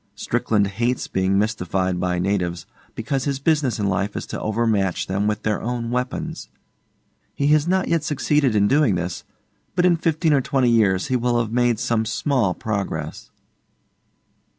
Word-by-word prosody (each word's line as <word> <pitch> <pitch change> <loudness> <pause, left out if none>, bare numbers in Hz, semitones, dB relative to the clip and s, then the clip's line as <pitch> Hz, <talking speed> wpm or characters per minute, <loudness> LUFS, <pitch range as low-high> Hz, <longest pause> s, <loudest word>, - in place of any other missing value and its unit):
Strickland 105 -1 0
hates 120 +6 -1
being 95 +1 +1
mystified 95 -3 -1
by 90 0 0
natives, 90 -2 -1 0.3
because 135 +4 -2
his 140 -2 -1
business 145 -3 +1
in 105 - -1
life 100 +1 -1
is - - -4
to - - -6
overmatch 110 -4 0
them 100 +2 -1
with 105 0 -2
their 105 -1 0
own 120 0 -3
weapons. 130 +7 -3 0.9
He 140 +1 +1
has 155 +1 +3
not 190 +1 +1
yet 165 -2 +1
succeeded 145 -4 +1
in 100 -1 +4
doing 140 -5 +3
this, 90 0 -4 0.5
but 180 -1 +3
in 175 -2 +4
fifteen 160 -1 +1
or 140 - +3
twenty 130 -3 +1
years 100 -2 +2
he 130 - +1
will 120 0 +1
have 115 -2 -2
made 120 -1 +2
some 110 0 0
small 115 -3 0
progress. 95 -8 -4
115 Hz, 165 wpm, -22 LUFS, 100-140 Hz, 0.9 s, in